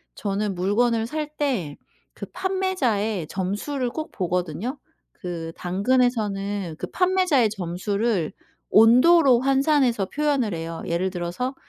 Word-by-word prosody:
저는 200 0 -2
물건을 225 +5 +1
살 305 +1 -5
때 220 - -1 0.4
그 - - -7
판매자의 280 - -1
점수를 210 - -2
꼭 315 +5 -6
보거든요. 180 - -2 0.4
그 165 -2 -6
당근에서는 200 -3 0
그 - - -4
판매자의 365 - +2
점수를 200 0 -2 0.4
온도로 250 +4 +6
환산해서 270 -5 +2
표현을 280 -9 0
해요. 165 0 -5
예를 175 +3 -1
들어서 185 +9 -4
220 Hz, 260 characters per minute, -24 LUFS, 185-275 Hz, 0.4 s, 온도로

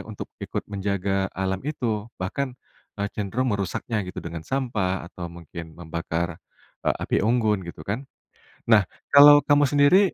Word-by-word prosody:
untuk - - -7
ikut - - -4
menjaga 95 -1 0
alam 95 0 -1
itu. 115 -7 -2
Bahkan, 125 +8 -3 0.4
eee, 100 0 -1
cenderung 110 +4 -1
merusaknya 100 +3 -2
gitu - - -6
dengan 85 -1 -5
sampah 105 -10 -1
atau 85 -1 -6
mungkin 85 -1 -10
membakar, 85 0 -3 0.5
eee, - - +3
api - - 0
unggun 110 -2 +2
gitu 75 -2 -9
kan. 125 +7 -4 0.6
Nah, 105 -3 +7 0.3
kalau 145 +1 +10
kamu 145 0 +5
sendiri, 145 +6 +6
100 Hz, 140 wpm, -25 LUFS, 90-125 Hz, 0.6 s, kalau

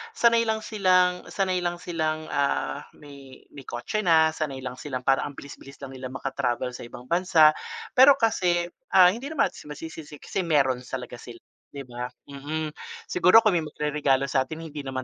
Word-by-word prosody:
sanay 230 - +3
lang 220 0 -1
silang 185 -3 +2
sanay 185 -2 -1
lang 175 0 -2
silang, 155 -3 -2
ah, 70 - -1
may 140 -3 -14
may 140 - -11
kotse 120 - -3
na, 160 -3 +4
sanay 140 -4 -5
lang 125 0 -6
silang 130 -4 -5
parang 135 +1 +2
ang 140 - -18
bilis 140 - -11
bilis 135 0 -13
lang 135 - -7
nilang 130 0 -8
makatravel 130 -2 -2
sa 120 - -9
ibang 120 - -11
bansa. 170 -2 +5 0.4
Pero 270 +2 +8
kasi, 180 -8 +1 0.3
ah, 180 -1 +8
hindi 240 +7 -6
naman 315 0 0
masisisi 150 0 -9
kasi - - -20
kasi - - -4
meron 135 -5 +2
talaga 125 -2 -6
sila 120 -1 -11 0.3
di 140 -1 -8
ba? 125 0 -6 0.2
Mm, 150 +2 -4 0.4
siguro 185 +5 +6
kung 215 - +4
may 175 - +2
magreregalo 150 -3 0
sa'tin 140 +4 -2
hindi 150 -2 -7
naman 130 -1 -4
150 Hz, 180 wpm, -25 LUFS, 135-180 Hz, 0.4 s, Pero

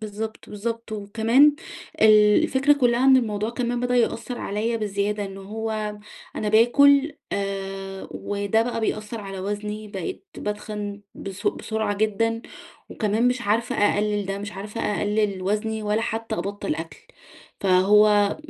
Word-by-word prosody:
بالضبط، 215 +1 -6
بالضبط، 230 +2 -4
وكمان 225 +7 +3 0.5
ال 210 -1 +6
الفكرة 275 +2 +3
كلّها 250 -3 +2
إن 265 -1 +7
الموضوع 215 -3 0
كمان 240 0 -2
بدأ 250 0 +1
يأثر 240 +1 0
عليَّ 220 +3 -1
بزيادة، 205 -1 -1
إنه 195 0 -8
هو 215 0 -4 0.4
أنا 215 - -1
باكل 280 +7 +5 0.2
آآ، 195 -1 -4
وده 205 +2 0
بقى 230 -1 -3
بيأثر 215 +1 -3
على 195 -2 -7
وزني، 210 +2 -4
بقيت 210 - -6
باتخن 210 -1 -5
بس 195 0 -7
بسرعة 220 -2 -1
جدًا، 225 +2 0 0.5
وكمان 220 +3 +1
مش 250 -1 -1
عارفة 220 +3 0
أقلل 205 0 +1
ده، 195 0 -3
مش 205 0 -6
عارفة 210 +3 -6
أقلل 205 -2 0
وزني 215 +3 -1
ولا 210 +1 0
حتى 225 0 -3
أبطّل 200 -6 -3
أكل. 165 +1 -7 0.6
فهو 205 +2 +4
210 Hz, 135 wpm, -24 LUFS, 205-230 Hz, 0.6 s, إن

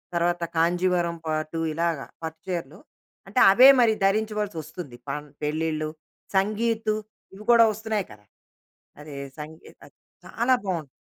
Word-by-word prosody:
తర్వాత 175 0 +1
కాంజీవరం 175 0 +1
పాట్టు, 155 +1 -2
ఇలాగా 165 -3 -1 0.2
పట్టుచీరలు. 165 0 -6 0.5
అంటే, 210 +6 0
అవే 255 +7 +8
మరి 220 -2 +4
ధరించవలసొస్తుంది. 195 - -2
పన్ 150 +1 -5
పెళ్ళిళ్ళు, 155 0 -1 0.5
సంగీతు 220 +2 +1 0.4
ఇవి 200 +2 -11
కోడా 235 -1 +8
ఒస్తున్నాయి 215 -1 -2
కదా! - - -16 0.8
అదే 150 -1 -10 0.2
సంగీతది 155 +1 -12 0.3
చాలా 245 +3 +1
బావున్ 175 -6 -2
175 Hz, 110 wpm, -25 LUFS, 160-215 Hz, 0.8 s, అవే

